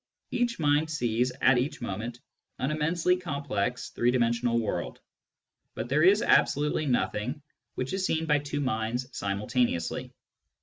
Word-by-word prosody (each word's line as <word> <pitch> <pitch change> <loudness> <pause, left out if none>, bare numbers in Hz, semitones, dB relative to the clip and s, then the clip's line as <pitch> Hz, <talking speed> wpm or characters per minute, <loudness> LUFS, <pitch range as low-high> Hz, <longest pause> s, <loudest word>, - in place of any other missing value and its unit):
Each 240 -1 0
mind 150 0 +2
sees 125 -5 0
at 130 -2 +6
each 130 +5 -2
moment 115 +5 -5 0.4
an 130 +3 -1
immensely 165 +4 +1
complex 140 - -2
three 120 - +1
dimensional 120 -1 +2
world; 110 - -3 0.8
but 115 +2 -4
there 150 +3 +3
is 195 +6 +5
absolutely 150 +1 +3
nothing 125 +2 -1 0.3
which 130 +5 -3
is 190 0 -1
seen 160 -3 0
by 150 -2 +3
two 145 0 -3
minds 120 0 -2
simultaneously. 100 -3 -1
130 Hz, 135 wpm, -28 LUFS, 120-150 Hz, 0.8 s, at